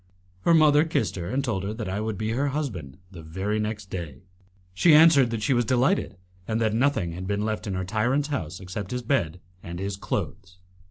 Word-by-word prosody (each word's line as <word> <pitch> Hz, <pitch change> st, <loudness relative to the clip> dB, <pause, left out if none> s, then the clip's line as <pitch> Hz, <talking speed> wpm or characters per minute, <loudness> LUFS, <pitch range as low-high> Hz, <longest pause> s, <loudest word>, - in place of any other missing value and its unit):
Her 170 Hz, -, +6 dB
mother 150 Hz, -1 st, +6 dB
kissed 160 Hz, -3 st, -1 dB
her, 85 Hz, -1 st, -4 dB
and 135 Hz, +1 st, -1 dB
told 110 Hz, -8 st, -1 dB
her 105 Hz, +2 st, -3 dB
that 110 Hz, -3 st, -5 dB
I 95 Hz, +3 st, -2 dB
would 110 Hz, -2 st, -3 dB
be 110 Hz, 0 st, -2 dB
her 135 Hz, +5 st, 0 dB
husband 120 Hz, -, -4 dB
the 85 Hz, -4 st, -10 dB
very 95 Hz, +7 st, -3 dB
next 105 Hz, -2 st, -4 dB
day. 85 Hz, -5 st, -6 dB, 0.5 s
She 155 Hz, -, +5 dB
answered 150 Hz, -5 st, +7 dB
that 115 Hz, -2 st, -3 dB
she 130 Hz, -, +2 dB
was 120 Hz, -1 st, +2 dB
delighted, 130 Hz, -, +1 dB, 0.3 s
and 110 Hz, 0 st, -1 dB
that 110 Hz, -2 st, +1 dB
nothing 115 Hz, -8 st, +1 dB
had 90 Hz, +2 st, -6 dB
been 100 Hz, +1 st, -1 dB
left 110 Hz, 0 st, -3 dB
in 95 Hz, -, -2 dB
her 95 Hz, 0 st, -2 dB
tyrant's 120 Hz, +9 st, 0 dB
house 90 Hz, -, -4 dB
except 95 Hz, +1 st, -6 dB
his 125 Hz, 0 st, -3 dB
bed 90 Hz, -, 0 dB, 0.2 s
and 85 Hz, 0 st, -7 dB
his 95 Hz, +1 st, -4 dB
clothes. 95 Hz, -1 st, -4 dB
110 Hz, 215 wpm, -25 LUFS, 95-130 Hz, 0.5 s, answered